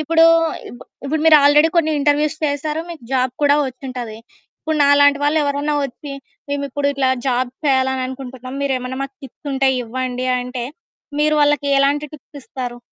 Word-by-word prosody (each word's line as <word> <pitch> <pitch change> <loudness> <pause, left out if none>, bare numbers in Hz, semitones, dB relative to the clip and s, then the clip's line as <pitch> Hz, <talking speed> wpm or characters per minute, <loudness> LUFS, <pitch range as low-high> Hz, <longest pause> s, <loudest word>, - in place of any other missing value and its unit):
ఇప్పుడూ 325 +2 +4 0.8
ఇప్పుడు 300 +3 -1
మీరు 315 -1 +8
ఆల్రెడీ 295 +2 +6
కొన్ని 320 -2 +3
ఇంటర్వ్యూస్ 295 +2 +1
చేశారు. 300 +2 -2
మీకు 330 -5 -9
జాబ్ 255 -1 +1
కూడా 285 0 +5
వచ్చింటది. 250 -4 -7 0.4
ఇప్పుడు 315 0 -2
నాలాంటి 285 0 +5
వాళ్ళెవరన్నా 290 0 +1
వచ్చి, 275 +2 -7 0.4
మేమిప్పుడు 280 0 -2
ఇట్లా 270 -2 0 0.2
జాబ్ 255 0 +1 0.2
చేయాలనుకుంటున్నాం. 260 -1 -2
మీరేమన్నా 260 -2 -2
మాకు 275 0 -7
టిప్స్ 280 +2 -10
ఉంటే 270 0 +2
ఇవ్వండి 255 +1 -3
అంటే, 250 -1 -5 0.6
మీరు 305 +1 +3
వాళ్ళకి 290 -1 +2
ఎలాంటి 285 +2 +2
టిప్స్ 300 -1 -12
ఇస్తారు? 245 -2 -6
280 Hz, 140 wpm, -19 LUFS, 255-295 Hz, 0.8 s, మీరు